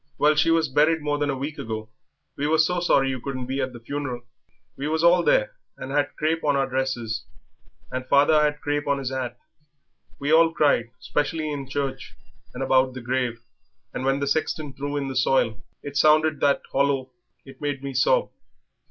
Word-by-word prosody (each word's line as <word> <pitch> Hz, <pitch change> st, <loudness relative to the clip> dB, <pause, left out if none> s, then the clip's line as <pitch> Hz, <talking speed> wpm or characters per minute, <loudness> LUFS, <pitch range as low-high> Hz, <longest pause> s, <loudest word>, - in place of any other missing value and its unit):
"Well, 150 Hz, +1 st, +4 dB
she 160 Hz, +2 st, +2 dB
was 165 Hz, -1 st, +3 dB
buried 155 Hz, +3 st, +2 dB
more 145 Hz, 0 st, -1 dB
than 145 Hz, 0 st, 0 dB
a 135 Hz, -, -1 dB
week 145 Hz, +4 st, -5 dB
ago. 110 Hz, -1 st, -5 dB, 0.5 s
We 145 Hz, -, -1 dB
were 160 Hz, +1 st, +3 dB
so 175 Hz, +3 st, +2 dB
sorry 135 Hz, -6 st, +2 dB
you 130 Hz, -2 st, -5 dB
couldn't 130 Hz, -2 st, -4 dB
be 135 Hz, +2 st, -2 dB
at 130 Hz, 0 st, -2 dB
the 120 Hz, -, -10 dB
funeral. 125 Hz, 0 st, -5 dB, 0.5 s
We 140 Hz, -, -4 dB
was 160 Hz, +1 st, 0 dB
all 175 Hz, +1 st, +6 dB
there, -, -, +2 dB, 0.3 s
and 135 Hz, -, -7 dB
had 145 Hz, 0 st, 0 dB
crape 160 Hz, +2 st, -1 dB
on 145 Hz, -1 st, +2 dB
our 135 Hz, -1 st, +2 dB
dresses 125 Hz, -5 st, -2 dB, 0.7 s
and 130 Hz, 0 st, -4 dB
father 150 Hz, +2 st, +5 dB
had 150 Hz, 0 st, 0 dB
crape 145 Hz, 0 st, -2 dB
on 140 Hz, 0 st, +2 dB
his 135 Hz, -1 st, -4 dB
'at. 130 Hz, -2 st, -4 dB, 0.8 s
We 145 Hz, +2 st, 0 dB
all 165 Hz, 0 st, +5 dB
cried, 140 Hz, -7 st, +2 dB
especially 155 Hz, +1 st, -2 dB
in 140 Hz, -2 st, -5 dB
church 140 Hz, -1 st, -4 dB, 0.4 s
and 125 Hz, -, -5 dB
about 130 Hz, -1 st, +2 dB
the 130 Hz, -, -6 dB
grave, 120 Hz, -1 st, -2 dB, 0.5 s
and -, -, -4 dB
when 135 Hz, +1 st, +1 dB
the 140 Hz, -, -1 dB
sexton 150 Hz, 0 st, -1 dB
threw 145 Hz, +1 st, -4 dB
in 140 Hz, -1 st, -2 dB
the 135 Hz, -, -5 dB
soil 125 Hz, -4 st, +2 dB, 0.2 s
it 145 Hz, 0 st, -7 dB
sounded 155 Hz, 0 st, +4 dB
that 140 Hz, -1 st, +2 dB
hollow 135 Hz, -1 st, +1 dB, 0.3 s
it 135 Hz, 0 st, -14 dB
made 145 Hz, -2 st, -3 dB
me 140 Hz, -1 st, -4 dB
sob. -, -, +2 dB
140 Hz, 195 wpm, -24 LUFS, 130-150 Hz, 0.8 s, all